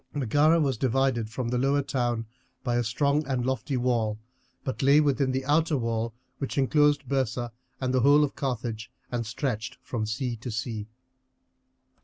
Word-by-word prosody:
Megara 145 +5 +3
was 135 -6 +1
divided 130 -3 +1
from 120 +1 -3
the 125 0 0
lower 140 +2 +2
town 120 -4 -1 0.4
by 120 -2 0
a 120 - +2
strong 140 +6 +1
and 130 -3 -1
lofty 130 +1 -1
wall, 115 -4 +1 0.5
but 130 - -3
lay 140 +2 +6
within 140 -3 +2
the 130 0 -2
outer 155 +1 +2
wall 115 -1 -1 0.3
which 135 - -4
inclosed 145 0 +3
Byrsa 120 -2 -1 0.3
and 130 -1 -1
the 130 - +3
whole 145 +4 +6
of 145 - -1
Carthage 120 -4 -3 0.2
and 120 -2 -2
stretched 115 -2 -3
from 110 -3 -3
sea 120 +2 -2
to 120 +3 -7
sea. 110 -2 -3
130 Hz, 165 wpm, -27 LUFS, 115-140 Hz, 0.5 s, lay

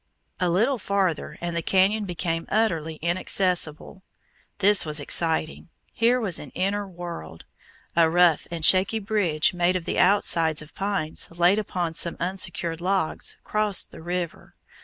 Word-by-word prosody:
A 180 -1 +1
little 225 +9 +1
farther, 185 -6 -1
and 170 0 -3
the 170 - -1
canyon 195 +5 +2
became 165 -2 -3
utterly 165 -8 0
inaccessible. 180 0 -1 0.6
This 205 0 +5
was 150 -1 +1
exciting; 160 +2 0 0.2
here 240 +2 +2
was 200 -8 -1
an 145 - -9
inner 200 +2 -1
world. 170 - -9 0.5
A 165 -1 +4
rough 175 -1 +3
and 165 -2 -2
shaky 190 +4 +4
bridge, 195 -8 0
made 175 +1 +1
of 180 -2 -3
the - - -2
outsides 165 -5 +2
of 155 - -17
pines 195 -6 -1
laid 175 +4 +2
upon 180 -5 -3
some 170 +1 0
unsecured 175 -2 -2
logs, 185 -2 0
crossed 210 -3 0
the - - -12
river. 175 0 -5
175 Hz, 145 wpm, -24 LUFS, 165-195 Hz, 0.6 s, This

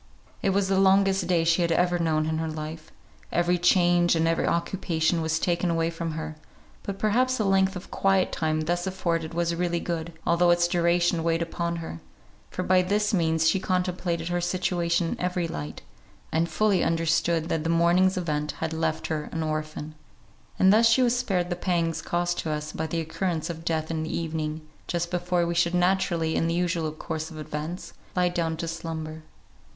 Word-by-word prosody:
It - - +1
was 195 0 +1
the 190 0 +2
longest 195 -1 +4
day 175 -2 +2
she 165 +2 +3
had 170 -1 +1
ever 175 +1 +2
known 155 -2 +1
in 160 0 -1
her 160 - -2
life; 155 0 -7 0.4
every 175 +1 +2
charge 175 -1 +4
and 165 0 +2
every 165 0 +1
occupation 170 -1 0
was 160 0 0
taken 175 +1 0
away 165 0 +1
from 165 -1 -4
her: 155 0 -5 0.4
but 195 -1 -5
perhaps 250 +5 +2
the 215 - 0
length 190 0 +3
of 180 - -8
quiet 195 -1 +2
time 155 -1 0
thus 175 +3 -1
afforded 170 -4 -2
was 170 0 0
really 175 0 0
good, 170 -1 -4
although 175 +1 +3
its 175 0 +4
duration 175 0 +2
weighed 165 0 +1
upon 170 0 -3
her; 160 - -6 0.5
for 185 - -4
by 185 0 +4
this 205 +3 0
means 160 -3 +2
she 175 +4 +3
contemplated 180 -2 -1
her 175 0 0
situation 175 -1 0
in - - -4
every 180 -1 -1
light, 75 - -6 0.5
and 165 +2 +1
fully 210 -3 +2
understood 165 0 +1
that 160 -3 -1
the 165 - -1
morning's 175 +3 +3
event 150 -4 -2
had 160 0 -4
left 160 0 -1
her 155 -1 -3
an 165 -1 -2
orphan; 155 0 -4 0.6
and 190 +1 +5
thus 225 +2 +5
she 255 +3 +4
was 240 0 +3
spared 190 -8 -1
the - - 0
pangs 170 -2 -1
caused 175 0 -1
to 160 - -3
us 150 0 -3
by 160 - -3
the 165 +1 -2
occurrence 165 +1 -2
of 165 -1 -9
death 160 -1 -1
in 160 -1 -2
the 160 - -3
evening, 160 -1 -3 0.3
just 170 0 -2
before 175 -1 0
we 170 - -1
should 170 +1 +2
naturally, 175 -3 +1
in 165 - +1
the 165 - 0
usual 170 -3 0
course 155 0 -5
of 160 - -10
events, 155 +3 -6 0.2
lie 180 -1 +3
down 165 -2 -1
to 165 - -4
slumber. 160 -1 -5
170 Hz, 195 wpm, -26 LUFS, 160-180 Hz, 0.6 s, and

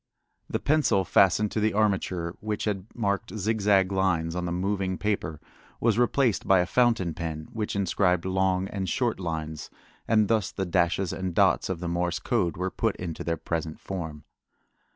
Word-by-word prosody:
The - - 0
pencil 140 -11 +2
fastened 100 +3 +4
to - - -1
the 110 -1 +1
armature 95 -5 0
which 105 -1 -3
had 100 -2 -2
marked 105 0 -2
zigzag 100 -2 +2
lines 90 -4 +1
on 90 0 -2
the 85 - -2
moving 95 +1 -1
paper 100 -7 -2 0.4
was 115 -1 +2
replaced 120 -2 +2
by 95 - +6
a 90 - +3
fountain 115 -6 +2
pen 80 -2 -5
which 110 -2 -3
inscribed 90 -2 +1
long 95 0 +1
and 95 -2 -3
short 120 -5 0
lines, 80 -3 -4 0.4
and 110 -2 +4
thus 110 -3 +1
the 95 - -3
dashes 90 +1 +1
and 95 -2 -4
dots - - +3
of 90 -2 -3
the 90 - -3
Morse 85 0 0
code 85 -2 0
were 95 +1 -2
put 115 -3 0
into 85 -3 -5
their 85 -1 -1
present 80 -2 -4
form. 80 -6 -6
95 Hz, 175 wpm, -27 LUFS, 85-105 Hz, 0.4 s, by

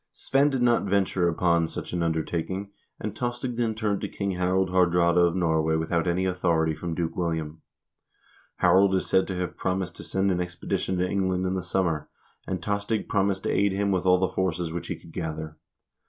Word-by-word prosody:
Svein 140 +2 +2
did 135 -3 0
not 120 -3 +3
venture 95 -2 +2
upon 85 0 +2
such - - -6
an 90 - -1
undertaking, 85 +4 -2 0.3
and 105 - -4
Tostig 120 +1 -3
then 115 -2 0
turned 105 -2 -1
to - - -3
King 100 -1 -2
Harald 90 +1 +1
Haardraade 90 -2 +3
of 85 0 +3
Norway 80 -3 +2
without 85 +2 0
any 90 +2 +1
authority 85 -3 +1
from 80 +2 -4
Duke 85 -1 -2
William. 80 -3 -2 0.9
Harald 95 0 +4
is 95 - 0
said 95 - +2
to 95 - -3
have 90 0 -3
promised 95 -2 -2
to - - -8
send 95 0 0
an 90 -1 0
expedition 90 +1 -2
to 90 +1 +1
England 95 -1 0
in 90 - 0
the 95 - -1
sum 90 +1 0
mer, 75 -3 -2 0.4
and 95 -3 -3
Tostig 105 +1 -1
promised 95 -1 +1
to - - 0
aid 100 -1 +2
him 100 +1 0
with 95 -1 0
all 90 0 +6
the 95 +1 +1
forces 90 -3 -1
which 85 - -4
he - - -3
could 80 - -15
gather. 80 -2 -5
90 Hz, 200 wpm, -26 LUFS, 85-95 Hz, 0.9 s, all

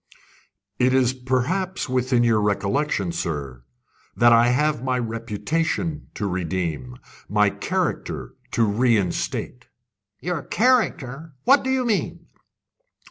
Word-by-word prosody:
"It 130 +1 +3
is 130 -1 +3
perhaps 130 +10 -1
within 125 -1 +1
your 115 -2 +3
recollection, 105 - 0
sir, 70 -8 -4 0.5
that 120 0 +6
I 115 +1 +5
have 145 +1 +1
my 130 -1 0
reputation 125 - -2
to 105 - -3
redeem, 85 -9 -3 0.3
my 105 -1 +3
character - - -3 0.2
to 115 - +3
reinstate." 115 +2 0 0.5
"Your 175 -3 -2
character? 165 - 0
What 270 +1 +5
do 260 - -3
you 260 -1 +1
mean?" 220 -4 -1
125 Hz, 110 wpm, -23 LUFS, 105-150 Hz, 0.5 s, that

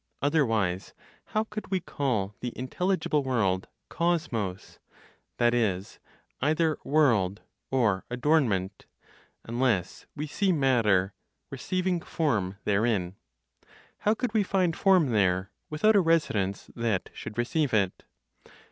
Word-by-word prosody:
Otherwise, 115 - 0 0.3
how 215 - 0
could 215 -1 -7
we 190 - +1
call 120 - -2
the 125 -1 -5
intelligible 155 +4 0
world 100 -8 0 0.2
"kosmos" 120 - -2 0.6
(that 120 0 +3
is, 100 -5 -1 0.4
either 155 +3 +2
world, 115 -10 +2 0.3
or 115 -8 +1
adornment), 120 - 0 0.6
unless 115 -6 -1
we 150 0 -3
see 190 +6 0
matter 115 - +2 0.4
(receiving) 180 +6 -1
form 105 - -1
therein? 100 -3 0 0.8
How 210 +2 +2
could 240 -1 -3
we 220 - +3
find 185 -4 +1
form 185 -9 +4
there, 95 -2 +1 0.2
without 210 +8 +3
(a 200 - +6
residence) 110 - 0
that 115 -5 -1
should 105 - -8
receive 135 +4 0
it? 100 -4 +1
125 Hz, 110 wpm, -27 LUFS, 100-160 Hz, 0.8 s, a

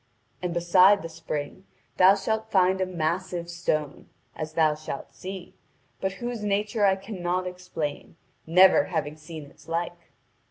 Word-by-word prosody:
And 180 -1 -2
beside 180 +3 +5
the 165 - -5
spring 160 +2 -6 0.3
thou 190 +2 +7
shalt 220 +2 -2
find 190 -1 +3
a 185 - +1
massive 175 0 -2
stone, 155 -4 -2 0.3
as 155 0 -5
thou 155 -2 +3
shalt 150 -2 -7
see, 185 +3 -8 0.5
but 190 0 -1
whose 240 +1 -5
nature 205 +1 +1
I 190 -1 +4
cannot 185 -2 -3
explain, 180 -6 -5 0.3
never 185 +3 +6
having 155 -4 -3
seen 155 -1 -9
its - - -20
like. 170 +1 -4
180 Hz, 145 wpm, -26 LUFS, 160-190 Hz, 0.5 s, thou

